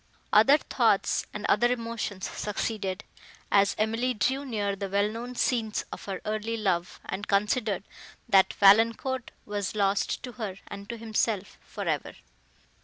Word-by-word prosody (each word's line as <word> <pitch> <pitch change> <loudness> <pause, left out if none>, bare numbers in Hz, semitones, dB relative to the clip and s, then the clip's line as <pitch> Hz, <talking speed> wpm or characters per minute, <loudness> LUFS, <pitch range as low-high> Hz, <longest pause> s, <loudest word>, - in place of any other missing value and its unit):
Other 265 +8 +7
thoughts - - +1
and - - -5
other 240 +1 +4
emotions 230 -5 -3
succeeded, 205 -2 -3 0.5
as 200 0 +4
Emily 230 +4 0
drew 260 +6 0
near 205 -6 -2
the 195 0 -4
well 200 +1 +2
known 240 +3 -6
scenes 230 -3 0
of - - -8
her 195 -2 -4
early 215 +2 -2
love, 180 -5 -1
and 200 +3 -5
considered, 205 0 +1 0.4
that 190 -1 +5
Valancourt 230 +5 +4 0.2
was 205 -1 -3
lost 200 -1 +1
to 250 - -6
her 215 -6 -5
and 200 0 -9
to 235 - -4
himself, 220 -3 -1
for - - -7
ever. - - -2
215 Hz, 145 wpm, -28 LUFS, 200-230 Hz, 0.5 s, Other